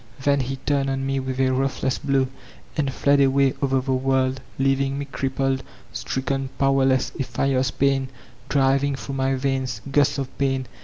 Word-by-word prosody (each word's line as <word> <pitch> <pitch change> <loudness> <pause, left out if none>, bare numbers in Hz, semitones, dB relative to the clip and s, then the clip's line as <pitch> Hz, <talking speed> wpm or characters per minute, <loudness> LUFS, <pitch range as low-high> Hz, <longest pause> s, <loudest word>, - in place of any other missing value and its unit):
Then 140 0 +3
he 135 +1 -2
turned 140 +1 0
on 135 0 -1
me 135 0 0
with 130 0 -4
a 130 -1 +3
ruthless 130 0 0
bk>w, 135 -2 +1 0.5
and 140 -3 0
fled 140 +1 +3
away 135 0 +3
over 135 -1 +2
the 135 +1 -3
world, 130 0 +1 0.2
leaving 135 0 +1
me 140 - -3
crippled, 135 -1 -1 0.3
stricken, 135 0 -2
powerless, 135 -1 +2
a - - +2
fierce 130 0 0
pain 135 -1 +1 0.4
driving 140 0 +2
through 135 +1 -6
my 135 0 +1
veins 130 -3 -1
— 140 - -7
gusts 145 0 +3
of 135 -2 -4
pain! 135 -1 0
135 Hz, 170 wpm, -23 LUFS, 130-140 Hz, 0.5 s, Then